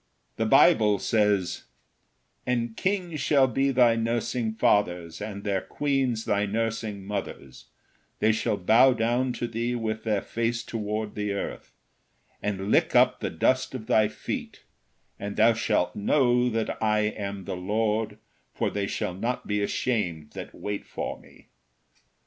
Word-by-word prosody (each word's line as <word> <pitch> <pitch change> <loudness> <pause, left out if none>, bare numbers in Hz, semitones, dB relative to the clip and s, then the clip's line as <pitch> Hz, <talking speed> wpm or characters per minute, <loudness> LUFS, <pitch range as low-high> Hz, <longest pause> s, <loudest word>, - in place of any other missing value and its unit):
The - - 0
Bible 105 -2 +5
says: 105 -3 +1 0.8
"And 120 -2 -1
kings 180 - -1
shall 140 -3 +4
be 135 +2 +1
thy 125 -3 +4
nursing 115 0 -1
fathers, 90 -6 +1
and 100 -1 -6
their 100 -2 0
queens 135 -6 -1
thy 100 0 +1
nursing 110 -2 -2
mothers; 95 -10 -6 0.5
they 110 - +3
shall 110 -1 0
bow 115 +8 +5
down 120 +3 0
to 120 - -3
thee 115 +2 -2
with 110 -2 -3
their 105 -3 0
face 115 0 -2
toward 110 -2 -3
the 105 -1 -2
earth, 100 - -6 0.7
and 100 -1 -2
lick - - +3
up - - +5
the - - -2
dust 130 0 +1
of 115 -4 -6
thy 110 -3 +4
feet, 110 - -6 0.6
and 100 0 -5
thou 115 +2 +5
shalt 110 -1 0
know 125 +2 +2
that 115 -1 -2
I 105 -1 +2
am 100 -2 -3
the - - -4
Lord, 105 +3 -1 0.4
for - - 0
they 100 -1 -2
shall 90 - -2
not 115 +7 -3
be 105 0 -1
ashamed 90 -9 -1
that - - -8
wait 105 0 -4
for - - -5
me." - - -20
110 Hz, 150 wpm, -26 LUFS, 105-120 Hz, 0.8 s, Bible